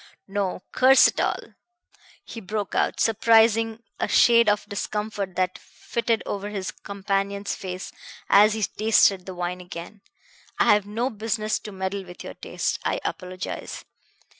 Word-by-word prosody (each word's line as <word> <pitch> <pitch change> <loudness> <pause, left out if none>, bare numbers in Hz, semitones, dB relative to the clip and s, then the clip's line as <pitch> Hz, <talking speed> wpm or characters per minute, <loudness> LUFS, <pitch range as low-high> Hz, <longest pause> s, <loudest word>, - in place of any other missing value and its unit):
No, 195 -2 -2
curse 260 +1 +6
it - - -6
all!" - - -2 0.7
he 230 - -8
broke 205 +1 -4
out, - - 0
surprising 225 0 +3 0.2
a - - 0
shade 235 -2 +5
of 210 0 0
discomfort 205 -2 -4
that 185 0 -1
fitted 230 -1 -2
over 205 0 -4
his 195 -3 -4
companion's 200 0 -3
face 185 -1 -6 0.4
as 210 +2 +6
he 220 -1 -2
tasted 200 -3 +3
the 185 - -6
wine 180 +1 -3
again. 180 +3 -9 0.6
"I - - +5
have 205 -1 +1
no 235 +5 -2
business 215 0 -2
to 210 - -9
meddle 190 +1 -3
with 180 -1 -11
your - - -7
tastes. - - -3
I - - -1
apologize. 185 0 -5
205 Hz, 145 wpm, -24 LUFS, 190-220 Hz, 0.7 s, curse